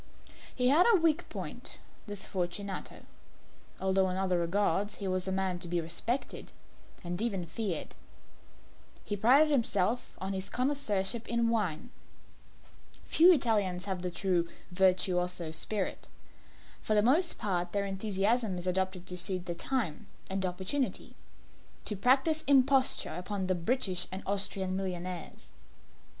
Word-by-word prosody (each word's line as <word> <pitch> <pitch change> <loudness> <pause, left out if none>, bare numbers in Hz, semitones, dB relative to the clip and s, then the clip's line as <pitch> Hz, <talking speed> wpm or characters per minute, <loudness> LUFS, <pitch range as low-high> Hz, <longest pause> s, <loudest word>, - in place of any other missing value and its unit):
He 250 0 +3
had 320 - +6
a 430 - +6
weak 330 0 +1
point - - -6 0.3
this 205 -1 -5
Fortunato 190 +1 -4 0.7
although 190 0 +2
in 185 - -2
other 185 -2 +1
regards 200 +3 0
he 200 - -5
was 185 0 -1
a - - -1
man 190 -2 -1
to 175 - -5
be 175 0 0
respected 170 +11 -3 0.5
and 175 +2 -4
even 200 -7 -1
feared. 175 0 -3 1.1
He 205 - -2
prided 265 +9 +5
himself 230 -3 0
on 190 +1 -4
his 190 0 -4
connoisseurship 235 -5 -1
in 235 0 +1
wine. 210 -1 -1 1.1
Few 345 +3 +6
Italians 205 - +2
have 190 -3 -3
the 180 - -2
true 175 -1 0 0.2
virtuoso 180 -2 +1
spirit. 190 +5 -1 0.7
For 215 - +1
the 210 - +4
most 320 +9 +3
part 180 -4 -1
their 200 -1 -1
enthusiasm 200 +1 0
is 175 - -5
adopted 185 0 -1
to 180 - -2
suit 185 -1 +2
the 175 - -3
time 205 - -2 0.2
and 190 0 -1
opportunity 190 +10 -3 0.7
to 210 - -2
practise 265 - +3
imposture 270 -1 +3
upon 190 +2 -3
the 185 - +1
British 185 0 0
and 190 +1 -5
Austrian 195 -1 0
millionaires. 180 -2 -5
195 Hz, 135 wpm, -31 LUFS, 180-230 Hz, 1.1 s, had